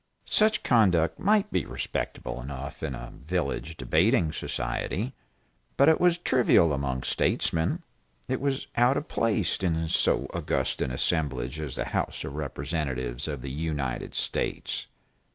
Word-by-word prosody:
Such 215 0 +3
conduct 90 -9 +3
might 210 +1 +3
be - - +1
respectable 65 - -4
enough 70 +2 -6
in 75 -5 -2
a - - -8
village 80 +1 -2
debating 85 0 +3
society, 90 - -2 0.6
but 140 - +6
it 160 - +4
was 175 -1 +5
trivial 120 - +4
among 65 -2 -1
statesmen, 85 - 0 0.4
it 130 0 -1
was 140 -1 0
out 120 +3 +4
of 150 - -3
place 105 -6 +1
in 80 -3 0
so - - +2
august - - -1
an - - +1
assemblage 70 -1 -1
as 75 -4 -4
the - - -2
House - - -2
of - - -5
Representatives 70 -4 -3
of 70 -5 -4
the 70 - -4
United 75 -4 -3
States. - - -2
80 Hz, 140 wpm, -28 LUFS, -, 0.6 s, but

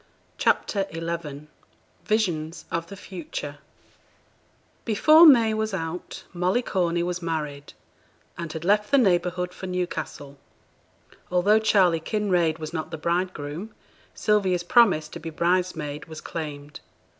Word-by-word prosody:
CHAPTER 200 -2 +1
XI 165 -3 -5 0.6
VISIONS 175 -7 -1
OF 165 0 -2
THE 200 - -9
FUTURE 155 -6 -7 1.2
Before 310 +9 +7
May 230 -6 +6
was 220 -2 -1
out, 165 0 -5
Molly 180 +7 +1
Corney 175 -5 0
was 180 0 -3
married 150 -4 -4 0.6
and 170 -2 -6
had 160 +1 -6
left 210 +2 +2
the 280 - +4
neighbourhood 180 -5 +1
for 190 - -7
Newcastle. 175 -6 -4 0.9
Although 195 +5 +4
Charley 190 -6 +3
Kinraid 175 -4 0
was 155 0 -7
not 160 -1 -3
the 160 - -6
bridegroom, 170 +2 -3 0.4
Sylvia's 190 -5 +1
promise 185 -6 +4
to - - -8
be 165 - -6
bridesmaid 165 -3 -1
was 160 -1 -9
claimed. 150 -3 -7
175 Hz, 120 wpm, -25 LUFS, 160-195 Hz, 1.2 s, Before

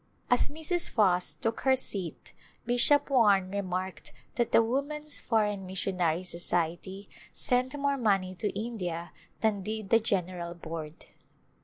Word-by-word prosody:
As 245 - +4
Mrs. 320 +4 0
Foss 185 -5 +2
took 225 0 -3
her 265 -1 +4
seat 195 -9 -1 0.3
Bishop 245 +5 +3
Warne 200 -7 +4
re 200 0 -1
marked 185 0 -5 0.2
that 240 -2 -1
the 230 - +5
Woman's 290 +5 -1
Foreign 210 -4 0
Missionary 185 -2 -1
Society 175 +2 -1 0.3
sent 255 +1 0
more 280 0 0
money 195 -6 +1
to 205 +3 -2
India 180 -7 -4 0.3
than 215 -3 +1
did 215 0 -5
the 230 - +6
General 180 -5 -2
Board. 160 -2 -8
200 Hz, 135 wpm, -29 LUFS, 180-245 Hz, 0.3 s, the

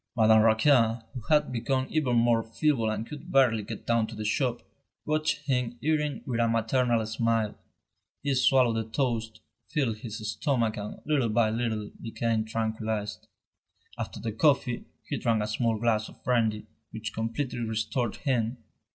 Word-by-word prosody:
Madame 110 -1 +6
Raquin, 115 0 +4
who 125 - -6
had 150 -2 +3
become 130 +2 0
even 140 -6 +1
more 115 -1 +4
feeble 115 +1 0
and 110 +1 -2
could 150 +3 -9
barely 125 -5 +4
get 105 +1 -7
down 115 -2 +2
to 115 - -8
the 110 0 -5
shop, 120 +2 0 0.4
watched 155 0 0
him 125 -3 0
eating 150 -1 0
with 120 -3 -2
a 115 - +3
maternal 115 0 +1
smile. 110 -1 0 0.7
He 140 -1 +1
swallowed 130 -3 +4
the 110 0 -3
toast, 115 -2 -2 0.3
filled 120 -6 0
his 110 -1 -6
stomach 115 -1 0
and 105 0 -7
little 145 -6 +1
by 110 0 +2
little 110 -2 -2
became 115 -1 -1
tranquillised. 110 -2 -3 0.7
After - - -5
the 115 - -3
coffee, 125 0 +2 0.2
he - - -2
drank 115 -2 +1
a - - -1
small 110 +1 0
glass 110 -1 +1
of - - -18
brandy 110 -4 +1 0.2
which 110 0 -6
completely 115 +3 -3
restored 110 +1 -1
him. 125 -4 -1
115 Hz, 160 wpm, -28 LUFS, 110-130 Hz, 0.7 s, Madame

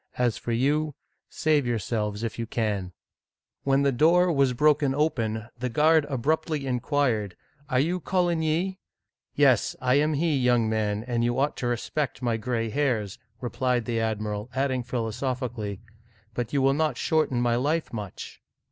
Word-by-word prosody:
As 120 -3 +2
for 120 - -5
you, 145 +5 +1 0.3
save 150 -4 +1
yourselves 110 -2 -2
if 115 0 -4
you 115 - -3
can! 105 -6 -2 0.4
" - - -62
When 135 0 +3
the 140 - +3
door 170 +7 +4
was 140 -4 +2
broken 145 0 +3
open, 115 -8 -1
the 125 0 -2
guard 155 +4 +4
abruptly 150 +2 -1
in 125 -2 0
quired, 120 - 0 0.2
" 140 0 -32
Are 130 -2 +2
you 170 +6 +1
Coligny? 175 0 0 0.3
" - - -55
Yes, - - +3
I 125 +3 +3
am 150 +1 +1
he, 160 +1 +1
young 125 -3 +3
man, 110 -1 -1
and 120 -2 -1
you 120 +1 0
ought 140 +2 +1
to 120 - -2
respect 125 +3 -2
my 120 -2 +1
gray 115 0 -2
hairs, 115 -8 -1
" 115 +2 -39
replied 125 -1 0
the 115 -2 -1
admiral, 105 0 -2
adding 130 -1 0
philosophically, 120 -3 -3 0.3
" 110 -1 -34
But 120 -1 -3
you 140 -2 +1
will 135 0 +4
not 150 -3 0
shorten 155 -6 +1
my 120 -1 +2
life 150 +6 -1
much 105 -4 -7
125 Hz, 175 wpm, -26 LUFS, 115-145 Hz, 0.4 s, door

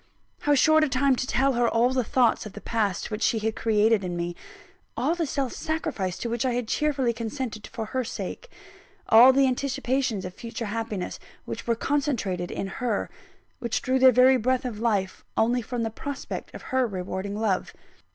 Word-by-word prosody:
How 290 0 +2
short 315 +3 +5
a 305 - +1
time 265 +1 +3
to 255 - -3
tell 270 +3 +2
her 240 -1 +2
all 235 +2 +3
the 260 -1 +1
thoughts 235 -1 +2
of 205 - -12
the - - -8
past 210 -5 -1
which 210 +1 -4
she 225 - +2
had 220 0 -1
created 220 -1 +2
in 175 -1 -3
me; 175 0 -3 0.6
all 325 - +1
the 340 -2 -1
self 270 -2 -2
sacrifice 210 - -3
to - - -4
which 235 +1 -1
I 255 -2 +1
had 245 -2 -2
cheerfully 275 -3 +1
consented 230 -1 -5
for 225 - -5
her 255 +4 -2
sake; - - -6 0.6
all 240 +4 +9
the 270 +1 +4
anticipations 260 -5 -1
of 180 - -6
future 230 +3 -6
happiness 215 -3 -4 0.3
which - - -6
were 235 - +2
concentrated 230 - -1
in - - -3 0.2
her, 235 -5 -1 0.5
which 235 -2 -2
drew 260 +1 +1
their 260 0 +8
very 255 +2 +6
breath 255 +2 0
of 230 -4 -4
life, 205 -5 -1
only 240 +2 +2
from 240 0 -3
the 225 - -2
prospect 280 +4 -6
of - - -9
her 260 -1 +3
rewarding 190 0 -4
love! 205 -4 0
235 Hz, 190 wpm, -26 LUFS, 215-260 Hz, 0.6 s, all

